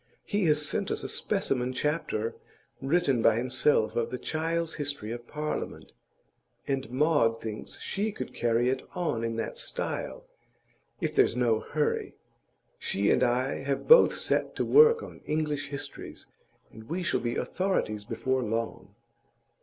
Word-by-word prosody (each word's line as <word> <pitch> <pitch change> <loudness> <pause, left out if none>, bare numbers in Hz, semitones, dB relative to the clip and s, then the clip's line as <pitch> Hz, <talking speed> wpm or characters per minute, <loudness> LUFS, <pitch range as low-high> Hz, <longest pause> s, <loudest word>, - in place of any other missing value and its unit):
He 205 -3 0
has 150 -1 +2
sent 195 +5 -2
us - - -2
a - - -3
specimen 130 -11 -1
chapter, 130 -6 -1 0.5
written 135 -4 +2
by 110 -1 +5
himself 120 -2 +2
of 120 -1 0
the 125 - -3
"Child's 165 +3 -2
History 145 -7 -4
of 120 0 -7
Parliament," 150 0 -4 0.8
and 135 -1 -1
Maud 130 -4 +2
thinks 110 -1 -6
she 210 +2 -2
could 130 -10 -6
carry 120 +1 +2
it 130 0 0
on 165 -11 -1
in 115 0 -1
that 115 -1 -3
style, - - -4 0.8
if - - -1
there's - - +4
no 120 -3 +2
hurry. 150 +4 -1 0.6
She 100 +1 +1
and - - +3
I 125 +2 +1
have 140 0 -2
both 480 +1 +8
set - - 0
to - - 0
work 460 0 +6
on - - -10
English 150 -2 -1
histories, 140 0 -7 0.5
and 110 0 -12
we 180 +3 -2
shall 170 - +1
be 120 0 -2
authorities 180 - -1
before 130 +5 -1
long. 110 -3 -3
135 Hz, 150 wpm, -28 LUFS, 115-155 Hz, 0.8 s, both